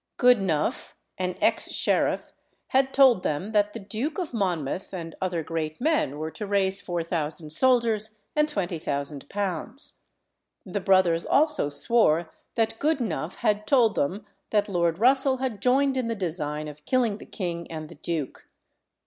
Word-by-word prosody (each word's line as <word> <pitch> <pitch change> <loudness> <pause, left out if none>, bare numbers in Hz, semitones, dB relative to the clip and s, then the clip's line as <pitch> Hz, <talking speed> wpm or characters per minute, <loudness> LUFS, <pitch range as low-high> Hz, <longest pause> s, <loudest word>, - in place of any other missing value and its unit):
Goodenough, 195 - +2 0.3
an 180 -1 -1
ex - - +2
sheriff, - - 0 0.4
had 265 0 +2
told 265 -8 +5
them 180 +4 -2
that 210 -1 +2
the 230 - -6
Duke 230 +10 -4
of 350 -8 -4
Monmouth 185 - -2
and 165 -2 -6
other 175 -3 -1
great 155 -1 -4
men 285 - +1
were 155 +1 -4
to 210 +3 -6
raise 195 -1 +1
4000 165 -3 -2
soldiers 225 -1 +3 0.2
and 300 0 +3
£20,000. 175 - -2 0.7
The 195 +1 -3
brothers 185 -3 +3
also 300 - +2
swore 160 +1 +2 0.2
that 225 -1 0
Goodenough 235 - -1
had 210 0 0
told 235 -5 +4
them 195 +9 -1 0.2
that 205 -1 +2
Lord 170 -4 +1
Russell 265 +4 +3
had 250 -6 -3
joined 265 +3 +3
in 255 -3 -1
the 230 - -1
design 155 -5 -3
of 150 0 -10
killing 235 -5 +1
the - - -10
king 170 -3 -4
and 155 -1 -6
the - - -12
duke. 155 -2 -5
195 Hz, 150 wpm, -26 LUFS, 165-235 Hz, 0.7 s, told